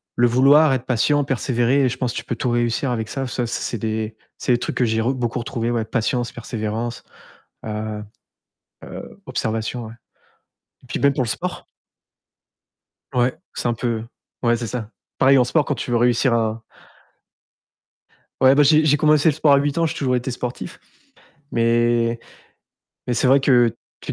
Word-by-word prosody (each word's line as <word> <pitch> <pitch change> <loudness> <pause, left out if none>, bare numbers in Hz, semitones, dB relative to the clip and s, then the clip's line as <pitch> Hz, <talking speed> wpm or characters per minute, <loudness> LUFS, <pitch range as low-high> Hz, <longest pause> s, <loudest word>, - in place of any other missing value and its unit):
le 120 0 +4
vouloir, 135 +4 +5
être 130 -1 -2
patient, 140 +4 +2
persévérer 130 0 +1
et - - +2
je 125 - -5
pense 125 -3 -2
tu - - -4
peux 120 - -3
tout 125 - -2
réussir 120 +2 0
avec 110 -2 -3
ça, 135 -2 -3
ça 120 -1 -2
c'est - - -3
c'est 120 - -3
des 110 0 -3 0.2
c'est - - -1
des 120 - +1
trucs - - -4
que 125 - +3
j'ai 110 0 0
re 125 +4 +1
beaucoup 120 -1 -2
retrouvé, 115 0 -3
ouais, 115 -2 -1
patience, 120 +1 -1
persévérance, 115 0 -4 0.6
heu 105 -1 -4 0.8
heu, - - -10
observation, 110 +1 -3
ouais 110 - -10 0.9
et - - -18
puis - - -4
même 140 0 +4
pour 130 - 0
le - - -5
sport - - -4 1.5
Ouais, 125 0 +2 0.2
c'est - - -2
un 120 - +1
peu 115 -1 -2 0.4
ouais, 120 -1 +3
c'est 115 0 -4
ça, 110 -2 -5 0.3
pareil 135 +1 +5
en 125 - +4
sport 145 +4 +1
quand 145 - -1
tu 130 - -5
veux - - +3
réussir 120 +1 +3
à 110 0 -1 1.8
Ouais, 130 +1 +6
bah, 145 - +5
j'ai 155 +2 +5
j'ai 150 -1 +4
commencé 150 +1 +4
le 150 - +2
sport 155 -2 +3
à - - +7
8 145 +2 -1
ans, 165 - +2
j'ai - - -3
toujours 125 -3 0
été 125 +2 -3
sportif 125 +8 -6 0.7
mais 115 0 +2 0.9
mais 125 - 0
c'est 125 - +2
vrai 135 +2 +6
que 125 -3 +4 0.3
tu - - -5
120 Hz, 185 wpm, -21 LUFS, 115-135 Hz, 1.8 s, à